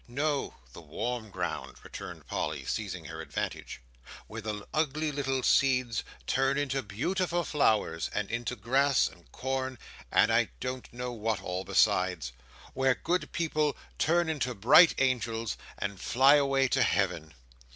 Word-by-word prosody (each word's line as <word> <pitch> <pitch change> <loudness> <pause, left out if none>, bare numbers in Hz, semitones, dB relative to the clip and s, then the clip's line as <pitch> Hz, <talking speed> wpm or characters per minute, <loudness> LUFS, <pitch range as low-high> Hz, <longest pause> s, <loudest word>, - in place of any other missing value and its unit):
"No! 145 +3 -1 0.2
The - - -10
warm 110 +8 -4
ground," - - -4
returned - - -9
Polly, - - -3
seizing 95 -6 -3
her 80 -1 -7
advantage, 80 - -5 0.4
"where - - -7
the 105 -2 -5
ugly 155 0 0
little 135 -2 -1
seeds 125 -5 +3 0.2
turn 135 +1 +1
into 135 -2 0
beautiful 175 - -1
flowers, 110 - +1
and 105 -1 -2
into 120 +1 -2
grass, 130 +5 +2
and - - -15
corn, 130 0 -3 0.3
and - - +4
I - - +3
don't 130 0 -5
know 125 +1 -4
what 110 -3 -1
all 90 +1 -3
besides. 90 -10 +2 0.4
Where 130 -1 +2
good 180 +1 -1
people 155 -3 0 0.2
turn 170 +2 +3
into 130 -6 -1
bright 120 - +7
angels, 115 -4 0 0.2
and 100 -2 -4
fly 135 +3 +5
away 135 -1 +2
to 135 - +2
Heaven!" 90 -10 0
125 Hz, 140 wpm, -29 LUFS, 105-140 Hz, 0.4 s, bright